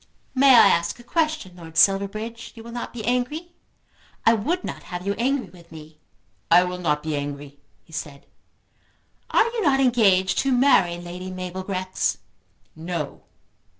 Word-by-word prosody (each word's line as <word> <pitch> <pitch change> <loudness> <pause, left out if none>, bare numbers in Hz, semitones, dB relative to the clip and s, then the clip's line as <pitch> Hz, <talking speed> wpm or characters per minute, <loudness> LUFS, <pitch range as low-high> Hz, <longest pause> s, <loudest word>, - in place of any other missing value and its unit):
"May 270 -1 +6
I 230 - +8
ask 170 -1 0
a - - -13
question, 310 - -1
Lord 165 -2 -11
Silverbridge? 215 +5 +1
You 225 - -11
will 235 - -10
not 240 0 -5
be 225 -3 -7
angry? 250 +8 -1 0.7
I 225 - +6
would 310 - -1
not - - -6
have 180 0 -6
you 200 - 0
angry 250 -6 0
with 170 -2 -17
me." 155 -1 -13 0.5
"I 175 +2 +7
will 180 0 -4
not 150 -4 0
be 155 -1 -2
angry," 145 0 -6 0.2
he 165 - -20
said. 145 -3 -7 1.0
"Are - - +4
you 465 -1 -3
not 280 -7 +3
engaged 200 -7 +3
to 270 - +1
marry 245 -9 +4
Lady 175 +2 -8
Mabel 185 0 -5
Grex?" 185 -1 -2 0.6
"No." 160 -2 -5
190 Hz, 160 wpm, -23 LUFS, 170-245 Hz, 1.0 s, I